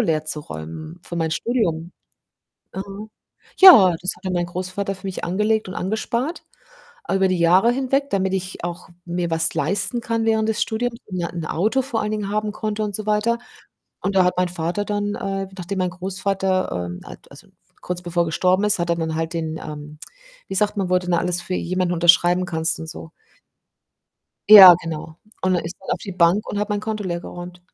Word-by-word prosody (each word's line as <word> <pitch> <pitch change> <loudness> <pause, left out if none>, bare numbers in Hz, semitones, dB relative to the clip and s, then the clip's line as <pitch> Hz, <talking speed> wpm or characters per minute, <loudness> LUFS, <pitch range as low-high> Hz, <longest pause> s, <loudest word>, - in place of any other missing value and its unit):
leerzuräumen 155 - -3
für 170 - -7
mein 160 -1 -1
Studium. 170 -3 -1 0.8
Mhm. 200 +3 -7 0.5
Ja, 215 - +9
das 185 +1 -1
hatte 185 -1 -6
mein 175 -1 0
Großvater 185 +3 -4
für 190 +1 -10
mich 190 - -4
angelegt 210 +4 0
und 185 - -7
angespart 235 - -3 0.7
über 195 0 +3
die 185 -1 0
Jahre 180 +7 +4
hinweg, 270 +2 0
damit 190 -1 0
ich 185 -2 -4
auch 175 +1 -5 0.2
mir 175 0 -3
was 165 0 0
leisten 200 - -1
kann 230 -1 -2
während 220 -1 +1
des 220 - -1
Studiums 230 +1 -2
und 185 -3 -5
ein 170 -1 -4
Auto 220 - 0
vor 240 -4 -3
allen 210 - -2
Dingen 210 -2 -3
haben 210 0 -1
konnte 215 0 -3
und 205 -2 -1
so 215 - -6
weiter 215 +2 +1 0.6
und 195 - -1
da 185 - +5
hat 180 - +2
mein 180 -1 0
Vater 175 +3 -2
dann, 205 0 -2
äh, 195 0 -3
nachdem 190 +2 -5
mein 185 -1 0
Großvater, 190 +1 -2 0.2
ähm 90 0 -7
al - - -10
also, - - -15 0.3
kurz 180 0 -4
bevor 175 0 0
er - - -3
gestorben 185 +4 +1
ist, 210 - +3
hat 175 - -2
er 170 - +1
dann 160 -1 -2
halt 165 +1 -2
den, 160 -1 -3
ähm 150 -1 -9 0.5
wie 195 - -4
sagt 210 +2 +1
man, 195 -3 -2
wo 185 - +3
du 180 - -10
denn 180 - 0
alles 175 +1 +1
für 185 - -5
jemanden 180 0 -1
unterschreiben 175 +1 +4
kannst 160 -1 +2
und 160 - -6
so? 160 -1 -9 1.4
Ja, 195 -4 +12
genau. 160 -1 -7 0.3
Und 185 0 +2
dann 175 - -1
ist 170 +2 -5
er 190 - -4
auf - - -2
die 195 - -7
Bank 175 +4 +2
und 205 - -3
hat 210 - -1
mein 210 -1 -1
Konto 215 -1 -4
leergeräumt 175 0 -6
185 Hz, 195 wpm, -21 LUFS, 170-210 Hz, 1.4 s, Ja